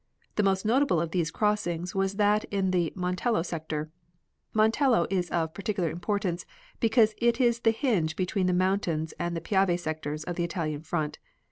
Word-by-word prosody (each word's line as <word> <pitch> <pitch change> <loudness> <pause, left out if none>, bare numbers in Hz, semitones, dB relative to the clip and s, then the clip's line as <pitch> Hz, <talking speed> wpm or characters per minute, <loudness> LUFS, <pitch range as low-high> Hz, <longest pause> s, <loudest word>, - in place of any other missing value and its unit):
The - - +2
most 195 0 +1
notable 245 - +3
of 165 0 -2
these 170 -3 0
crossings 180 -3 -1
was 195 0 0
that 210 +1 +3
in 195 -2 0
the 175 -3 +1
Montello 185 +2 0
sector. 155 -2 -4 0.6
Montello 220 - +3
is 180 -2 0
of 160 -2 -1
particular 195 -4 -1
importance, 180 0 -2 0.4
because 225 -1 +4
it 235 +1 +2
is 235 -2 +3
the 230 - +3
hinge 220 - +1
between 185 0 0
the - - +3
mountains 180 -4 0
and 175 -1 -2
the - - -4
Piave 190 0 +2
sectors 155 -2 -4
of 175 +2 -5
the 175 - 0
Italian 160 -4 -3
front. 155 -1 -3
185 Hz, 170 wpm, -28 LUFS, 165-210 Hz, 0.6 s, because